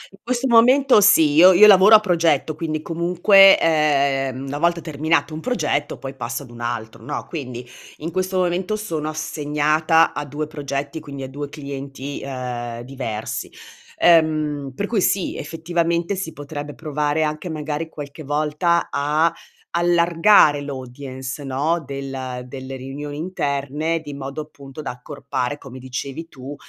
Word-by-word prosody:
In - - -26
questo 250 +2 -1
momento 250 +1 +5
sì, 195 -7 +6
io 180 +5 +8
io 195 +4 +8
lavoro 205 +1 +8
a 215 - +9
progetto, 165 -6 +1
quindi, 155 -1 -3
comunque, 180 +4 +5
ehm, 140 -4 +1
una 140 +1 -4
volta 170 +1 +2
terminato 155 -1 -1
un 155 - -5
progetto, 160 - -1
poi 135 0 -7
passo 125 +1 -5
ad 125 - -14
un 120 0 -11
altro, 115 -2 -5
no, 150 - -5
quindi 125 -6 -6 0.3
in 165 +3 -6
questo 185 +1 -1
momento 180 +3 0
sono 165 -8 -4
assegnata 155 +1 +1
a 145 - -3
2 145 +2 -4
progetti, 145 0 -5
quindi 140 -3 -8
a 130 - -6
2 145 +1 -6
clienti, 140 -1 -7
uhm, 125 -3 -5
diversi. 120 -4 -5 0.5
Ehm, 155 -4 +2
per 200 - -2
cui, 210 -1 0
sì, 190 0 0
effettivamente, 170 +3 -1
si 185 -4 -4
potrebbe 145 0 -7
provare 150 0 -1
anche 155 +3 -3
magari 155 +1 -4
qualche 145 0 -9
volta 150 +4 0
a 150 +4 +1 0.4
allargare 170 -2 +4
l'audience, 130 0 -7
no, 145 +5 -1
del 135 -2 -6
delle 130 +1 -8
riunioni 140 +3 -7
interne, 155 -1 -2
di 145 -2 -8
modo, 140 +2 -6
appunto, 145 -1 -11
da - - -3
accorpare, 140 +1 -4
come 130 -2 -11
dicevi 130 +5 -6
tu, 135 +1 -9
150 Hz, 150 wpm, -21 LUFS, 135-170 Hz, 0.5 s, a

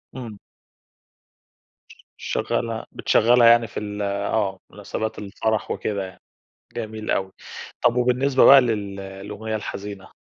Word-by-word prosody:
إمم. 115 -5 -7 1.5
ش - - -16 0.3
شغّلها 115 -1 -2
بتشغّلها 120 +1 +4
يعني 115 0 +6
في 100 - -6
ال 105 0 -5
آه. 100 -1 -1
مناسبات 110 +2 -5
الفرح 105 +1 -2
وكده 100 -2 -2
يعني، 95 - -13 0.6
جميل 110 -2 -4
أوي. 95 -1 -1 0.5
طب 120 0 +3
وبالنسبة 125 +2 +3
بقى 135 0 +10
لل 105 -5 -2
للأغنية 100 +3 -6
الحزينة؟ 100 -2 -7
110 Hz, 115 wpm, -23 LUFS, 100-115 Hz, 1.5 s, بقى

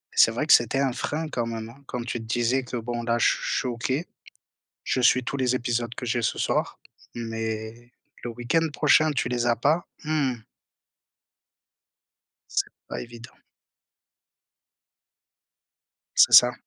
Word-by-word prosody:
c'est - - +6
vrai - - -2
que - - +7
c'était 135 - +4
un 135 -3 +1
frein 155 +4 -3
quand 120 -5 -2
même, 115 -1 -5
hein, 135 +4 -16
comme 120 -1 -4
tu 125 -1 -3
le 110 - -9
disais 120 +3 0
que, 125 -1 -5
bon, 120 +1 -4
là, 120 0 +1
je - - +4
suis - - +1
je - - -8
suis 130 - -1
OK, 130 +7 -2 0.8
je 130 - 0
suis 125 0 +4
tous 140 - -4
les 130 -1 +1
épisodes 120 -1 -2
que 125 - -6
j'ai 120 +1 0
ce - - -1
soir, - - -1 0.4
mais 115 0 -5 0.3
le 120 - -4
week-end 125 +8 0
prochain, 155 +1 +4
tu 135 -3 -1
les 120 -1 -1
as 120 -1 +3
pas, 155 +7 +1 0.2
mmh 150 -4 0 2.2
c'est - - +1 0.2
pas - - -5
évident. 120 0 -11 2.8
C'est - - +6
ça. 125 0 +9
120 Hz, 160 wpm, -25 LUFS, 115-135 Hz, 2.8 s, ça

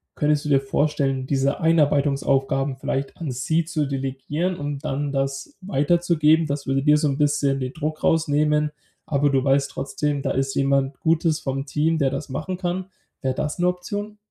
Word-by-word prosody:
Könntest 150 0 +1
du 150 - -2
dir 140 - +5
vorstellen, 135 -1 0
diese 135 0 +1
Einarbeitungsaufgaben 140 -3 +2
vielleicht 135 +1 -3
an 155 -6 -4
sie 160 +6 0
zu 155 -3 -1
delegieren 135 +6 -2
und 145 0 -5
dann 145 0 -2
das 135 - -3
weiterzugeben? 165 -2 +2
Das 140 0 -3
würde 135 0 +1
dir 150 0 +5
so 150 0 +1
'n 135 - -1
bisschen 145 -2 +1
den 130 0 -4
Druck 155 +1 -4
rausnehmen, 150 -1 +2 0.3
aber 145 0 +2
du 135 -1 +2
weißt 140 0 +2
trotzdem, 140 +1 -2
da - - -1
ist 135 0 -1
jemand 135 0 +1
Gutes 160 -1 +2
vom 135 -1 -3
Team, 155 +3 +1
der 135 -2 +2
das 135 +1 -4
machen 155 +7 -4
kann. 180 +1 -2 0.4
Wär 130 -2 0
das 150 +3 -3
'ne 175 - +3
Option? 205 +4 -3
145 Hz, 175 wpm, -23 LUFS, 135-155 Hz, 0.4 s, dir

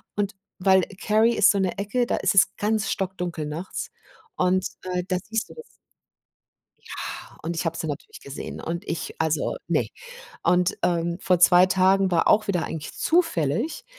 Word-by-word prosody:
Und 205 0 -1 0.2
weil 190 0 +5 0.2
Carry 220 +2 +3
ist 205 - +5
so 200 - -1
'ne 190 -2 0
Ecke, 215 +5 0
da - - -1
ist 190 0 +1
es 195 0 +5
ganz 215 -1 0
stockdunkel 180 -5 -3
nachts 165 +5 -5 0.5
und, 185 +1 +1 0.2
äh, 180 -1 -2
da 185 -1 0
siehst 225 -1 -2
du - - -12
das. 470 - -9 1.2
Ja, - - -7
und 170 +1 -3
ich - - -2
habe 165 0 -1
sie - - -4
natürlich 145 -2 -7
gesehen 140 - -7
und 170 +3 -4
ich 165 - -4
also, 160 - 0
ne. - - +1 0.6
Und, 180 0 +2
ähm, 170 -1 0
vor 180 -2 +2
2 180 +1 +7
Tagen 190 0 +3
war 170 -2 +3
auch 215 - +4
wieder 180 -4 0
eigentlich 155 -2 -6
zufällig. 295 - 0
185 Hz, 170 wpm, -24 LUFS, 170-200 Hz, 1.2 s, 2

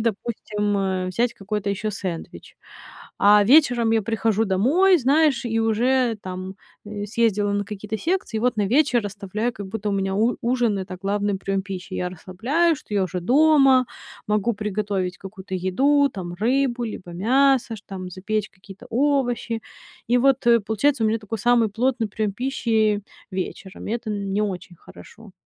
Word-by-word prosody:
допустим, 210 -2 -2
э, 190 -1 -1
взять 235 +6 0
какой-то 205 0 -4
ещё 210 +2 -2
сэндвич. 185 -4 -7 0.6
А 205 +1 +6
вечером 245 -3 +4
я 225 - +3
прихожу 225 0 0
домой, 280 - +4
знаешь, 275 -1 +2
и 225 0 -1
уже 235 +1 +2
там, 185 +1 -6 0.3
э, 205 -1 -5
съездила 210 -2 +1
на 205 0 -1
какие-то 210 +1 -5
секции, 340 -10 -1
и - - -4
вот 245 -1 +1
на 205 - +2
вечер 250 -2 +2
оставляю, 205 +3 -3
как 200 -2 -8
будто 210 +1 -3
у - - -1
меня 195 -1 -1
у 225 +4 +1
ужин- 235 -4 +1
это 185 -1 -6
главный 205 0 -1
приём 195 0 -1
пищи. 190 -1 -7
Я 180 -1 -2
расслабляюсь, 260 - 0
что 210 - -8
я 200 - +2
уже 180 0 -4
дома, 270 - +5 0.4
могу 210 +2 +1
приготовить 200 -3 -2
какую-то 190 -1 -8
еду 275 +11 +2
там, 175 -3 -6
рыбу 245 +3 0
либо 190 -5 -7
мясо, 250 +4 +2
ш 205 - -14
там 185 -2 -7
запечь 205 +3 -3
какие-то 195 +1 -14
овощи. 245 -3 0 0.5
И 245 - +4
вот, 270 -1 +2
э, 235 0 +6
получается, 225 +4 +1
у - - +4
меня 225 +1 +1
такой 220 +1 -5
самый 235 +1 +3
плотный 230 +1 0
приём 210 0 -2
пищи 220 -3 0 0.3
вечером. 190 +1 -6
Это 230 +1 -3
н 200 -1 -3
не 205 - +1
очень 180 -3 -5
хорошо. 215 +5 -15
215 Hz, 165 wpm, -23 LUFS, 195-240 Hz, 0.6 s, А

